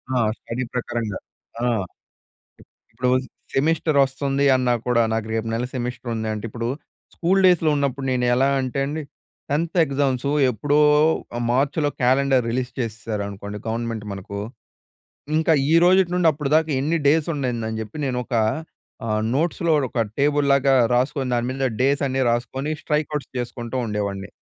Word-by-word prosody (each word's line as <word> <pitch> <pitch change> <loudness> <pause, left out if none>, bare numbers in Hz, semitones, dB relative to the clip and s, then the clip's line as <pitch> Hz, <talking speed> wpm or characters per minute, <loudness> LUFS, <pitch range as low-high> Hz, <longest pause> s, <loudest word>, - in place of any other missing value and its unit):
ఆ! - - +2 0.2
స్టడీ 125 +2 -4
ప్రకారంగా. 120 -4 -3 0.4
ఆ! - - +2 1.3
ఇప్పుడు 125 0 -1 0.4
సెమిస్టర్ 155 +1 +1
వస్తుంది 135 +1 -1
అన్నా 125 -1 +2
కూడా, 120 -1 +3
నాకు 110 -1 -2
రేపు 115 0 -1
నెల 120 +2 -1
సెమిస్టర్ 125 -1 -4
ఉంది 110 0 -3
అంటే, 105 +1 -5
ఇప్పుడు 115 +1 -4 0.5
స్కూల్ 185 +3 +2
డేస్‌లో 175 -3 +4
ఉన్నప్పుడు 140 -1 -1
నేను 125 -1 +1
ఎలా 135 +2 +3
అంటే 130 +1 -3
అండి, 155 +2 -3 0.5
10థ్ 165 +4 -1
ఎగ్జామ్స్ 135 -2 0 0.2
ఎప్పుడో 145 +5 0 0.7
మార్చిలో 145 +3 +1
క్యాలెండర్ 130 0 +3
రిలీజ్ 125 +1 -2
చేసేశారనుకోండి 105 -3 -4
గవర్నమెంట్ 115 -1 -3
మనకు, 100 +1 -6 1.0
ఇంకా 160 0 +3 0.2
ఈరోజుటి 180 +2 +5
నుండి 175 -2 +3
అప్పటి 145 -1 -4
దాకా 160 0 +3
ఎన్ని 155 +5 +1
డేస్ 155 +2 +3
ఉండిందనిజెప్పి 110 -4 -3
నేనొక, 125 -1 -3 0.7
ఆహ్, 110 0 0
నోట్స్‌లో 165 +2 +1 0.2
ఒక 115 -3 0
టేబుల్‌ 145 0 +2
లాగా 135 0 +4 0.2
రాసుకొని 130 0 0
దాని 120 0 0
మీద 135 0 -1
డేస్ 140 +1 +2
అన్నీ 130 0 +1
రాసుకొని, 130 +5 -2
స్ట్రైక్ 150 -1 -1
అవుట్స్ 140 - -5
చేసుకుంటూ 120 +1 -4
ఉండేవాడిని. 100 -1 -3
130 Hz, 135 wpm, -22 LUFS, 115-145 Hz, 1.3 s, ఈరోజుటి